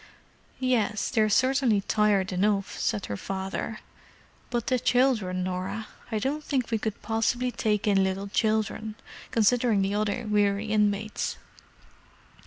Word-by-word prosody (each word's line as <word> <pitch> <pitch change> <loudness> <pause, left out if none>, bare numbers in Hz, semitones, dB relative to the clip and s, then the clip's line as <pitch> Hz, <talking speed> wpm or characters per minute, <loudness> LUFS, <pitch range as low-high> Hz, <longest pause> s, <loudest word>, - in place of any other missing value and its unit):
"Yes, 230 -5 0
they're 220 -3 +3
certainly 255 -2 +3
tired 200 -2 +2
enough," 195 +1 +1
said 205 - -1
her 100 - -4
father. 195 - -4 0.7
"But 240 -2 -1
the 255 -1 +1
children, 240 -8 +2
Norah? 185 +4 -4 0.2
I 220 - 0
don't 280 +8 -2
think 260 -6 -1
we 225 - +1
could 215 -1 -4
possibly 240 +3 0
take 210 -2 0
in 195 -2 +4
little 190 +1 -2
children, 215 +1 0 0.3
considering 230 -2 +3
the 195 +1 -1
other 215 +3 -1
weary 205 0 +2
inmates." 210 0 0
215 Hz, 130 wpm, -27 LUFS, 200-235 Hz, 0.7 s, in